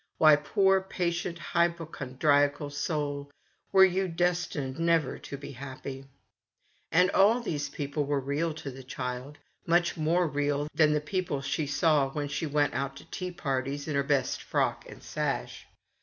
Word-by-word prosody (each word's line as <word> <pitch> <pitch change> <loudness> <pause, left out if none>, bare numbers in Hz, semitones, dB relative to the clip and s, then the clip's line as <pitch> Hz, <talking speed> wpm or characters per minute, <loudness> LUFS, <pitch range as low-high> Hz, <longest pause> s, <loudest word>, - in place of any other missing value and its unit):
Why, 155 -1 +7
poor 190 +6 +3
patient 175 -2 -2
hypochondriacal 145 -4 +1
soul, 145 -1 -2 0.4
were 190 0 +8
you 190 +1 +1
destined 165 -5 -1
never 165 -4 +2
to 140 - -7
be 140 - -8
happy? 135 0 -7 0.9
And 180 +4 +4
all 215 +5 +5
these 155 -11 -3
people 145 +1 -2
were 145 0 0
real 145 +5 -1
to 155 -3 -6
the 130 +1 -10
child, 125 +2 -5 0.3
much 175 +1 +2
more 165 +3 +2
real 145 0 0
than 155 -2 +4
the 150 - +1
people 175 -2 -2
she 140 +2 -2
saw 145 -1 +3
when 145 +1 -3
she 160 - -2
went 145 0 +1
out 135 0 -2
to - - -12
tea 180 -1 -4
parties 140 -3 -3
in 155 - -2
her 140 - +2
best 140 -2 0
frock - - -1
and - - -12
sash. - - -3
150 Hz, 155 wpm, -29 LUFS, 140-170 Hz, 0.9 s, were